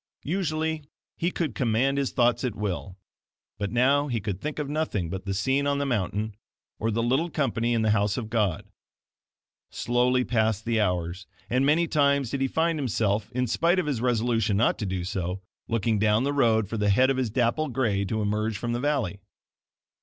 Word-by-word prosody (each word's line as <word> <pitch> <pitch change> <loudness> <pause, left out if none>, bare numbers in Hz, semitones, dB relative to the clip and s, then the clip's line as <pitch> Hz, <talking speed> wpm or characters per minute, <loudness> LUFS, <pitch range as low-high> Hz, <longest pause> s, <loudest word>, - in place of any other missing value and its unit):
Usually 160 -2 -1 0.3
he 170 - 0
could 165 -8 -2
command 125 +5 +1
his 140 - -1
thoughts 120 0 +2
at 125 -5 -2
will, 95 -2 -4 0.6
but 100 -1 -2
now 135 +4 +3
he 120 -4 -1
could 100 -2 -4
think 150 0 -4
of 150 -2 -2
nothing 140 - -2
but 95 +1 -5
the 100 - -2
scene 135 +8 +1
on 140 0 +1
the 140 - -1
mountain, 110 -3 -1 0.5
or 110 - 0
the 115 +1 0
little 135 +8 +1
company 120 -6 0
in 115 - +1
the 110 - +3
house 100 -1 +1
of 110 -3 -5
God. 105 -4 0 1.0
Slowly 125 +1 +1
passed 110 -3 0
the 115 -2 +1
hours, 90 -1 -2 0.2
and 130 +3 +2
many 165 +3 +3
times 140 -5 +2
did 140 - -2
he 135 - +2
find 160 +3 0
himself, 110 -4 0
in 125 +1 0
spite 165 - +2
of 185 - +1
his 140 -6 -1
resolution 115 -4 +1
not 115 - +2
to 105 - -2
do 95 -1 -2
so, 90 0 -3 0.2
looking 115 -1 0
down 105 +2 +3
the 140 +1 0
road 110 -6 +3
for 115 - -4
the 105 -1 +1
head 130 +7 +4
of 135 - -1
his 130 -3 0
dapple 125 +6 +1
gray 115 -6 0
to 110 +2 -1
emerge 105 +1 -1
from 120 +3 -3
the 120 - -1
valley. 125 -9 -1
115 Hz, 200 wpm, -26 LUFS, 105-140 Hz, 1.0 s, head